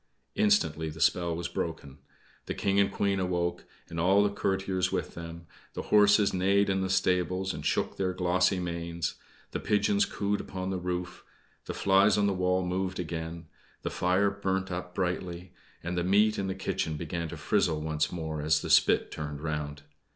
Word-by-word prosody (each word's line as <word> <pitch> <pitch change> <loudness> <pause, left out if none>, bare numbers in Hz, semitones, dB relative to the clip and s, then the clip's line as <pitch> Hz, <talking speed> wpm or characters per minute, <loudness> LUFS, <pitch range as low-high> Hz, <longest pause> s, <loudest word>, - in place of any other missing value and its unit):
Instantly 205 - +2
the 80 +1 -9
spell 85 +2 +2
was 85 +1 -3
broken. 70 -4 -5 0.5
The - - -3
King 100 0 +1
and 100 0 +3
Queen 100 -1 0
awoke, 90 -1 -1 0.2
and 85 - -5
all 95 +4 +4
the 105 - +1
courtiers 95 -2 0
with - - -2
them; 85 0 -8 0.3
the - - -3
horses 105 0 +5
neighed 100 +2 +3
in 95 0 0
the 95 - -1
stables, 95 0 +1
and 75 - -7
shook 75 - 0
their 95 -1 0
glossy 90 +1 +2
manes; 85 -1 -3 0.4
the - - -3
pigeons 105 -1 +2
cooed 100 0 -1
upon 95 0 -5
the 95 - -2
roof; 90 0 -4 0.4
the - - -5
flies 100 +1 +4
on 105 - +3
the 100 - +2
wall 90 0 +1
moved 95 +1 -2
again; 80 0 -5 0.4
the - - -2
fire 95 +3 +2
burnt 95 -1 -2
up 90 0 -5
brightly; 90 -1 -3 0.3
and 90 +2 -3
the 90 - 0
meat 105 +4 +3
in 95 - -1
the 95 - -2
kitchen 80 -4 -2
began 85 +1 -4
to 85 - -7
frizzle 80 +1 +1
once 75 -2 -1
more 80 -3 -4
as 75 0 +2
the - - -3
spit - - +4
turned 75 -2 -5
round. 75 -1 -4
90 Hz, 180 wpm, -29 LUFS, 85-95 Hz, 0.5 s, horses